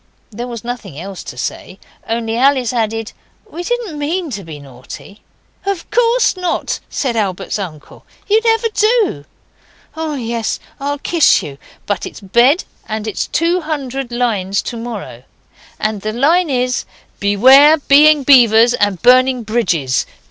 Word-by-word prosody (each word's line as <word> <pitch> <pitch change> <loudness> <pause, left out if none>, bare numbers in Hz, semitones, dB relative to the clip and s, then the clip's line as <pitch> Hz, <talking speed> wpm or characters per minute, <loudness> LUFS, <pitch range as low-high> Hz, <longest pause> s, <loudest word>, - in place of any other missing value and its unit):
There 235 +3 -6
was 235 -2 -7
nothing 235 - -7
else 190 +1 -8
to 125 - -9
say, 185 +8 -5 0.3
only 225 0 -2
Alice 260 -1 +2
added, 225 -1 -2 0.4
'We 350 -5 -7
didn't 425 -6 -3
MEAN 325 +2 -2
to 200 -4 -5
be 160 -3 -9
naughty.' 140 - -12 0.4
'Of 390 -3 -4
course 485 -1 +2
not,' 360 -2 -2
said 255 -4 -2
Albert's 195 -2 -2
uncle, 160 -7 -9 0.2
'you 430 +2 +3
never 450 0 +2
do. 430 - +1 0.7
Oh, 320 -2 -3
yes, 235 -3 -3 0.2
I'll 285 +1 -2
kiss 325 +2 +3
you 140 -1 -9 0.3
but 205 - -2
it's - - -11
bed 240 - +3 0.2
and 215 0 -4
it's 215 - -3
two 340 +3 0
hundred 275 -5 -4
lines 210 -6 -1
to 240 - -5
morrow, 225 - -7 0.6
and 215 -2 -2
the 215 +1 -3
line 315 +8 +2
is 250 -1 -1 0.3
"Beware 260 +10 +6
of 300 - -15
Being 295 +1 +6
Beavers 240 -3 +6
and 205 -6 0
Burning 255 0 +4
Bridges. 170 - 0
245 Hz, 150 wpm, -16 LUFS, 205-300 Hz, 0.7 s, Beware